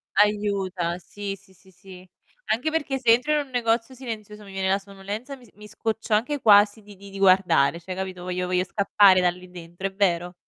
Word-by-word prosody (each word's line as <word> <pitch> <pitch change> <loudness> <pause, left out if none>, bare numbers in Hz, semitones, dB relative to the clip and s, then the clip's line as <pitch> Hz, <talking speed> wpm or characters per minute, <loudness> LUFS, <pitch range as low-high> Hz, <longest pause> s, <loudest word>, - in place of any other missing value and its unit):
Aiuta, 195 -4 0
sì, 200 +2 -7
sì, 190 -1 -22
sì, 190 +1 -23
sì. 185 0 -15 0.4
Anche 250 +8 0
perché 290 -4 -1
se 245 -3 -1
entro 250 +6 +3
in 300 - +2
un - - -20
negozio 230 0 0
silenzioso 215 -5 -8
mi 195 -1 -13
viene 190 0 -1
la 195 +1 +2
sonnolenza, 200 +7 -8
mi 255 -2 -18
s - - -21
mi 210 +1 -13
scoccio 225 +1 -3
anche 250 +8 +1
quasi 210 -1 +5
di 205 -1 -15
di 200 +1 -13
di 195 - -10
guardare, 185 -5 +3
cioè 185 +2 -7
capito, 185 -1 -6
voglio 180 0 -3
voglio 180 0 +1
scappare 195 0 +4
da 180 -1 +3
lì 180 +1 -9
dentro, 175 +2 -7
è 195 - -10
vero. 180 -3 0
200 Hz, 210 wpm, -24 LUFS, 185-220 Hz, 0.4 s, quasi